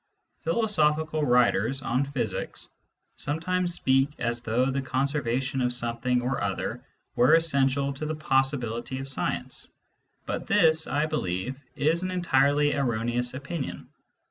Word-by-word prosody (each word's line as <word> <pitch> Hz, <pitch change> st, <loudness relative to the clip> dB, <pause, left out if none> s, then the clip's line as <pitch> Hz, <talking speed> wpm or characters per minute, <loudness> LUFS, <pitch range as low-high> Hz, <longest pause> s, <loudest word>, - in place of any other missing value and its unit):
Philosophical 160 Hz, -5 st, +1 dB
writers 125 Hz, 0 st, +2 dB
on 125 Hz, +3 st, +1 dB
physics 140 Hz, -2 st, -4 dB, 0.5 s
sometimes 175 Hz, +4 st, 0 dB
speak 135 Hz, +1 st, +3 dB
as 120 Hz, 0 st, -2 dB
though 120 Hz, +3 st, +1 dB
the 135 Hz, +1 st, -1 dB
conservation 135 Hz, -1 st, -1 dB
of 125 Hz, 0 st, +1 dB
something 120 Hz, +1 st, -1 dB
or 130 Hz, +2 st, -1 dB
other 95 Hz, -1 st, -3 dB, 0.3 s
were 125 Hz, +6 st, +6 dB
essential 140 Hz, -3 st, +2 dB
to 150 Hz, +3 st, -5 dB
the 155 Hz, -, -2 dB
possibility 135 Hz, -4 st, 0 dB
of 135 Hz, +1 st, -5 dB
science, 135 Hz, -, -2 dB, 0.5 s
but -, -, -4 dB
this, 160 Hz, -5 st, +4 dB
I 145 Hz, +3 st, +1 dB
believe, 130 Hz, -, -3 dB
is 160 Hz, +4 st, +1 dB
an 185 Hz, -, -2 dB
entirely 145 Hz, -5 st, +2 dB
erroneous 120 Hz, -1 st, -1 dB
opinion. 140 Hz, +2 st, -5 dB
135 Hz, 125 wpm, -27 LUFS, 125-155 Hz, 0.5 s, were